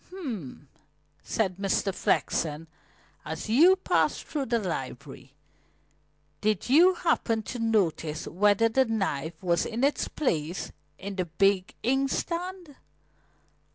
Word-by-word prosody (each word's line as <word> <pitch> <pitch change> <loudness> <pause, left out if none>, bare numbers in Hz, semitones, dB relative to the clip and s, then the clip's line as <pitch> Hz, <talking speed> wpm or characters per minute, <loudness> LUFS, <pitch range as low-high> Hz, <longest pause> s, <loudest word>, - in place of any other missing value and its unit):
"H'm!" 230 - -7 0.5
said 190 -5 -1
Mr. 195 0 0
Flexen. 155 -3 0 0.6
"As 160 +6 -6
you 330 +12 +6
passed 375 - 0
through 285 -4 -3
the 235 - +2
library, 140 - -6 1.1
did 215 +1 0
you 355 +6 +6
happen 235 -11 0
to 245 - -6
notice 170 -8 0
whether 205 +4 +3
the 260 +4 +2
knife 170 - -2
was 170 -1 +2
in 235 +3 -3
its 285 +1 +1
place 170 - -2 0.3
in 195 0 -7
the 185 - 0
big 190 +3 +1
inkstand?" 335 +6 -2
205 Hz, 115 wpm, -27 LUFS, 170-270 Hz, 1.1 s, you